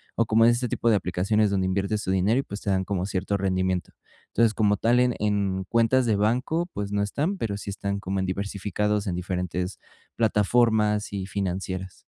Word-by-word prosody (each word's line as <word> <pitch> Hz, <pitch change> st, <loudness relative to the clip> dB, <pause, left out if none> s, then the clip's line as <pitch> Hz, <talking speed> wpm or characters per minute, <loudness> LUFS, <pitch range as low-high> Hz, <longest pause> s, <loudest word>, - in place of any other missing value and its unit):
o 115 Hz, -, +2 dB
como 115 Hz, +1 st, +4 dB
en 120 Hz, -, +6 dB
ese 120 Hz, +1 st, 0 dB
tipo 115 Hz, -, +1 dB
de -, -, +4 dB
aplicaciones 100 Hz, +3 st, +1 dB
donde 95 Hz, -2 st, 0 dB
inviertes 100 Hz, +3 st, -1 dB
tu 95 Hz, -, -1 dB
dinero 95 Hz, +5 st, +2 dB
y, -, -, -1 dB
pues, 100 Hz, -4 st, -7 dB
te -, -, -3 dB
dan 95 Hz, -1 st, +1 dB
como 95 Hz, -2 st, -2 dB
cierto 95 Hz, 0 st, -1 dB
rendimiento. 95 Hz, -2 st, -1 dB, 0.3 s
Entonces, 115 Hz, -1 st, +2 dB
como 105 Hz, -1 st, +2 dB
tal, 120 Hz, +4 st, +3 dB
en 125 Hz, -1 st, +2 dB
en 100 Hz, -2 st, 0 dB
cuentas 115 Hz, +4 st, +3 dB
de 110 Hz, -3 st, +2 dB
banco, 125 Hz, +11 st, 0 dB
pues, 100 Hz, -1 st, -4 dB
no 100 Hz, 0 st, 0 dB
están, 145 Hz, -, -1 dB
pero 100 Hz, -3 st, -2 dB
sí 100 Hz, -, -6 dB
están 100 Hz, 0 st, -3 dB
como 95 Hz, 0 st, -3 dB
en 95 Hz, -, -1 dB
diversificados 100 Hz, +2 st, -2 dB
en 90 Hz, -, -1 dB
diferentes 90 Hz, +1 st, -3 dB, 0.4 s
plataformas 105 Hz, -1 st, +2 dB
y 95 Hz, -2 st, -3 dB
financieras. 95 Hz, -1 st, -4 dB
100 Hz, 195 wpm, -25 LUFS, 95-110 Hz, 0.4 s, en